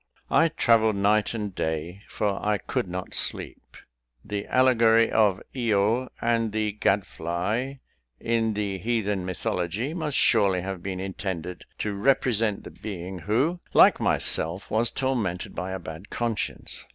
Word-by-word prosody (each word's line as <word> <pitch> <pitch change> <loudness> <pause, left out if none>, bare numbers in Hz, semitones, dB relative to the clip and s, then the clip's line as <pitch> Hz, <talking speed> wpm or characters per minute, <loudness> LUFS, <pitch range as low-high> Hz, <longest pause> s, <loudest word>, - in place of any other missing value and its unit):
I 165 - +5
travelled 115 -8 +3
night 105 +3 +2
and 105 -3 -4
day; 80 +4 -3
for 100 -2 -2
I 105 0 +2
could 95 - -3
not 90 +1 -5
sleep. - - -2 0.5
The 105 -1 -4
allegory 115 -3 +4
of 105 -4 +3
Io 115 +1 +1
and 115 -2 +1
the 110 0 0
gad 100 -1 +1
fly, 105 +11 -3 0.4
in 115 -2 0
the 100 -2 -2
heathen 105 -3 -1
mythology, 90 - -2
must 155 -4 -2
surely 100 -5 +3
have 95 -1 -5
been 95 0 -4
intended 95 -2 -5
to 105 - -2
represent 110 -1 +1
the - - -9
being, 95 -3 -7
who, 130 - 0 0.2
like - - +7
myself, 85 +5 0
was 110 +2 +2
tormented 115 -11 -2
by 90 +2 -4
a 95 - -3
bad 80 +1 -9
conscience. 120 -2 -3
105 Hz, 140 wpm, -26 LUFS, 95-115 Hz, 0.5 s, like